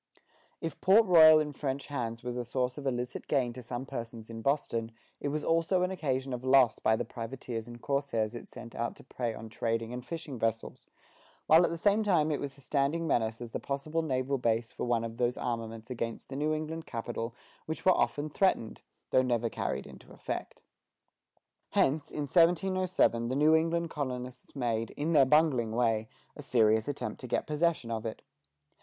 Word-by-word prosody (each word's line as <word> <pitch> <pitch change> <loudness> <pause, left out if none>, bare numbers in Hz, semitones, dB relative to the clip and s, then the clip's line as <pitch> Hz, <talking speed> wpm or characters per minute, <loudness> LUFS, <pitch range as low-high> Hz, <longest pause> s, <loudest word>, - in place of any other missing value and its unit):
If 165 -3 -5
Port 205 +4 +6
Royal 160 -4 +9
in 150 -1 0
French 135 -1 -3
hands 115 -5 -4
was 125 0 -4
a 125 - -2
source 125 +1 -1
of 140 - -4
illicit 125 -1 -3
gain 130 -5 +1
to 125 - -8
some 120 +2 -5
persons 115 -2 -7
in 115 0 -6
Boston, 115 -4 0 0.3
it - - -3
was 150 +1 -2
also 165 +3 +2
an 180 - 0
occasion 135 -7 -2
of 125 0 -4
loss 130 -3 +5
by 110 - +3
the - - -2
privateers 115 -1 -6
and 120 0 -10
corsairs 125 -6 -1
it 120 - -8
sent 120 -1 -10
out 120 0 -3
to - - -15
prey 120 -3 -3
on 110 - -8
trading 115 +1 -2
and 125 0 -5
fishing 155 -5 -6
vessels, 115 0 -2 0.6
while 160 +3 +7
at - - +3
the 170 - -3
same 205 +5 +3
time 170 -7 +2
it 145 - 0
was 140 -1 -5
a - - -12
standing 145 +4 0
menace 115 -6 0
as 120 -1 -7
the - - -3
possible 150 +4 -2
naval 135 -2 -1
base 115 -1 0
for - - -4
one 120 -2 +1
of 115 0 -6
those 120 0 +1
armaments 115 0 -4
against 115 -2 -4
the 135 - -6
New 150 +2 0
England 155 +1 -3
capital 115 0 -4 0.3
which 160 - -5
were 185 - +7
often 145 +1 0
threatened, 155 - 0 0.3
though 130 - +5
never 120 -3 0
carried 65 - -3
into - - -14
effect. - - -6 1.1
Hence, 145 +2 +2
in 150 - -4
1707 175 -5 +3
the 130 - -1
New 150 +3 +5
England 165 +1 +1
colonists 125 -3 -5
made, 115 -4 -1
in 155 +3 0
their 140 -3 +7
bungling 130 -6 +3
way, 115 -2 +1 0.3
a - - -8
serious 110 -5 +3
attempt 145 -1 -4
to 130 - -6
get 120 - 0
possession 155 -5 0
of 110 -1 -2
it. 110 - -7
130 Hz, 195 wpm, -30 LUFS, 115-155 Hz, 1.1 s, Royal